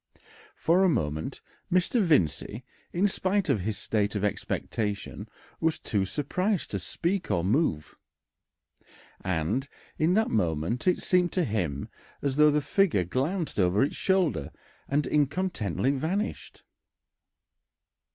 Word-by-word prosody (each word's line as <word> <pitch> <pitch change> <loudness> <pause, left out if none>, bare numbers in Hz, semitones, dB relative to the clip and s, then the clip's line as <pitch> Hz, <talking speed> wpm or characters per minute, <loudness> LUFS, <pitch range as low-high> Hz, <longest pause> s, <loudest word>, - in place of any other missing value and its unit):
For 175 +4 +3
a 190 - +5
moment 80 - -2 0.3
Mr. 185 +6 +3
Vincey, 120 - +1 0.3
in 185 +4 +2
spite 195 -1 0
of 130 -7 +3
his 100 +2 -2
state 105 +1 0
of 105 - -1
expectation, 105 0 -2 0.3
was 160 -1 +1
too 100 -4 -1
surprised 180 - -1
to 100 - -1
speak 175 - -2
or 85 - +1
move, 100 - 0 1.3
and 95 - -1 0.3
in 165 +4 +3
that 220 +1 +2
moment 85 - 0
it 180 - +2
seemed 180 -1 +3
to 180 - +2
him 90 - -2 0.3
as 140 -1 -2
though 150 0 +7
the 150 0 +2
figure 160 - +2
glanced 150 - -2
over 95 +4 +3
its 140 - -1
shoulder 185 - +1 0.4
and 145 +1 +1
incontinently 145 - 0
vanished. 165 +10 -3
140 Hz, 125 wpm, -28 LUFS, -, 1.3 s, though